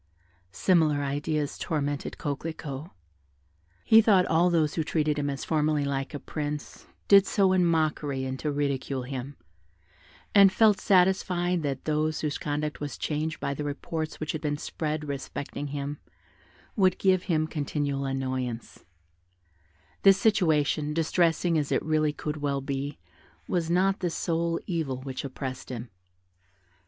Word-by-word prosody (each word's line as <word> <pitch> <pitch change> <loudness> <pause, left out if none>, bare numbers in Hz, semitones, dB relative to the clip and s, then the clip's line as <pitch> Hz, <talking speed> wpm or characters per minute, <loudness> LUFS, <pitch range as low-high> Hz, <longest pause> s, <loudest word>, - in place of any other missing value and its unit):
Similar 155 - +2
ideas 145 +1 -2
tormented 145 -2 -2
Coquelicot. 150 0 -5 1.0
He 225 0 +8
thought 200 -4 +4
all 170 +2 +3
those 160 -3 +2
who 160 - 0
treated 150 -1 0
him, 145 0 -1
as 140 -1 -4
formerly, 150 -2 +1
like 135 +1 -2
a - - -4
prince, 150 0 -5 0.2
did 195 -1 +7
so 195 -2 +3
in 185 -1 +3
mockery, 155 -4 0
and 130 0 -4
to 150 - -1
ridicule 140 -2 -1
him, 135 +2 -6 1.0
and 200 -1 +8
felt 210 0 +4
satisfied 180 -2 +2
that 140 -3 -3
those 155 0 0
whose 150 -2 -2
conduct 150 +1 -2
was 145 -1 -5
changed 155 +1 -2
by 140 - -2
the 150 - -4
reports 155 +2 -4
which 155 - -2
had 155 - -4
been 145 -1 -1
spread 150 0 -3
respecting 140 +1 -5
him 145 +1 -4 0.8
would 185 -3 +3
give 185 -2 +2
him 155 -2 +2
continual 145 -2 -2
annoyance; 130 -3 -3 1.2
this 195 -1 +7
situation, 155 -7 +2
distressing 165 0 +2
as 145 - -3
it - - +1
really 155 -1 +2
could 150 0 -4
well 140 -2 -1
be, 140 +1 -4 0.5
was 170 -2 -1
not 190 +3 +2
the 180 - 0
sole 165 0 -1
evil 155 -8 -2
which 135 -1 -5
oppressed 130 -1 -6
him. 120 -2 -6
150 Hz, 145 wpm, -27 LUFS, 140-165 Hz, 1.2 s, He